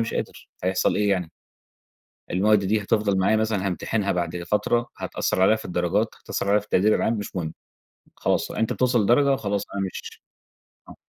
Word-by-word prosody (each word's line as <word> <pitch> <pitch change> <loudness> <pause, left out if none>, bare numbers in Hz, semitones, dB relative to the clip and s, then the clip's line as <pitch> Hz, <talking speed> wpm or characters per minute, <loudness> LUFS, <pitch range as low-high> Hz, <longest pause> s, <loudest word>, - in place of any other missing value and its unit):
مش 115 - -2
قادر، - - -5 0.2
هيحصل 95 0 +1
إيه 105 -1 +2
يعني؟ 90 -4 0 1.0
المواد 105 +3 +4
دي 105 +2 +1
هتفضل 100 -1 +1
معايا 100 +4 +3
مثلًا 105 -3 0
هامتحنها 100 +2 -1
بعد 85 0 -2
فترة، 120 +6 0
هتأثَّر 95 - -1
عليَّ 110 +4 +5
في - - -10
الدرجات 90 +5 0
هتأثر 100 - -3
عليَّ 105 - +4
في 105 - -13
التقدير 105 +2 +3
العام، 115 - +1
مش 105 -3 -5
مهم. 80 -3 -3 0.6
خلاص - - 0
أنت 110 - -1
بتوصل 125 -3 +2
لدرجة 135 +6 +4
خلاص 100 -4 -2
أنا 100 - -2
مش 95 - -8 0.7
آه. - - -11
100 Hz, 175 wpm, -24 LUFS, 95-110 Hz, 1.0 s, عليَّ